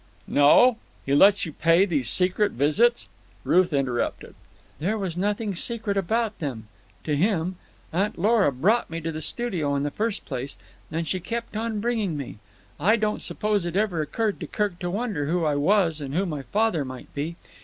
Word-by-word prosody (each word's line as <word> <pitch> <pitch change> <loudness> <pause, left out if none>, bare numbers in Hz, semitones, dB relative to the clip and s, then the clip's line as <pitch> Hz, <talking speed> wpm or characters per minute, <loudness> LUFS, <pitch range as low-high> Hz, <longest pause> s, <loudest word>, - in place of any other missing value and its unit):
"No? 185 - +5 0.3
He 135 - 0
lets 195 +7 +5
you 160 - -7
pay 165 +6 +4
these 150 - 0
secret 185 +3 +2
visits——" 210 - +2 0.4
Ruth 185 -1 +3
interrupted. 135 -4 -2 0.5
"There 195 +8 0
was 190 -5 -3
nothing 205 +3 -1
secret 215 +2 -1
about 215 +3 0
them—to 130 - -6
him. 180 +1 0 0.4
Aunt 195 +5 0
Lora 205 -3 +3
brought 200 - +1
me 165 +1 -4
to 165 0 -3
the 155 0 -6
studio 160 -6 -1
in 140 - 0
the 145 - -2
first 215 +3 -2
place, 135 0 -5 0.3
and 165 +1 -2
she 185 - -1
kept 230 +4 -5
on 220 -1 -2
bringing 220 -8 -1
me. 135 -6 -7 0.4
I 205 +9 +4
don't 215 -1 -1
suppose 210 -3 -1
it 175 0 -4
ever 195 -5 +1
occurred 215 +7 -2
to - - -6
Kirk 205 -5 -2
to 175 - -3
wonder 200 -7 -2
who 170 +1 0
I 150 - +2
was 165 +1 +2
and 140 0 -5
who 190 +3 +1
my 150 -6 -4
father 200 0 0
might 130 -1 -9
be. 155 +4 -3
180 Hz, 180 wpm, -25 LUFS, 150-210 Hz, 0.5 s, No